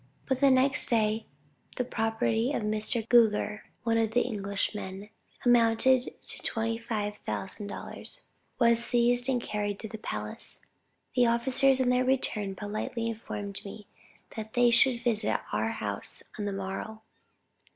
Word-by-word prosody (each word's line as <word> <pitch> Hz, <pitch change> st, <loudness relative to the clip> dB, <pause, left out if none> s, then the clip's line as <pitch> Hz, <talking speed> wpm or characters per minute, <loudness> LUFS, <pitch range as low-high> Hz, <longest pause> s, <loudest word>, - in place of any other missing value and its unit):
But 265 Hz, -1 st, 0 dB
the 280 Hz, 0 st, +5 dB
next 260 Hz, +1 st, +3 dB
day, 220 Hz, -1 st, +1 dB, 0.5 s
the 250 Hz, -, 0 dB
property 225 Hz, +1 st, 0 dB
of 230 Hz, -, -1 dB
Mr. 215 Hz, +2 st, 0 dB
Gouger, 215 Hz, -3 st, +3 dB, 0.2 s
(one 230 Hz, -1 st, +2 dB
of 225 Hz, -1 st, 0 dB
the 245 Hz, -, +4 dB
Englishmen,) 200 Hz, -2 st, -3 dB, 0.4 s
amounting 240 Hz, +2 st, +5 dB, 0.2 s
to -, -, -7 dB
25,000 220 Hz, -3 st, -3 dB
dollars, -, -, -7 dB, 0.4 s
was 235 Hz, -1 st, +4 dB
seized 245 Hz, +1 st, +2 dB
and 255 Hz, -2 st, +2 dB
carried 205 Hz, -3 st, -3 dB
to 220 Hz, -, -5 dB
the 220 Hz, 0 st, -8 dB
palace. -, -, -4 dB, 0.5 s
The 245 Hz, -2 st, +5 dB
officers 265 Hz, +3 st, +3 dB
on 255 Hz, -1 st, +2 dB
their 250 Hz, 0 st, +3 dB
return, 215 Hz, -7 st, 0 dB
politely 215 Hz, +3 st, -4 dB
informed 205 Hz, -3 st, -5 dB
me, 205 Hz, +1 st, -9 dB, 0.5 s
that 220 Hz, -1 st, -6 dB
they 245 Hz, -1 st, +5 dB
should 235 Hz, 0 st, +4 dB
visit 220 Hz, -3 st, +1 dB
our 110 Hz, +1 st, +1 dB
house 100 Hz, -2 st, -1 dB, 0.2 s
on 205 Hz, -, -2 dB
the 205 Hz, -, -1 dB
morrow. 195 Hz, +3 st, -5 dB
225 Hz, 140 wpm, -29 LUFS, 210-245 Hz, 0.5 s, the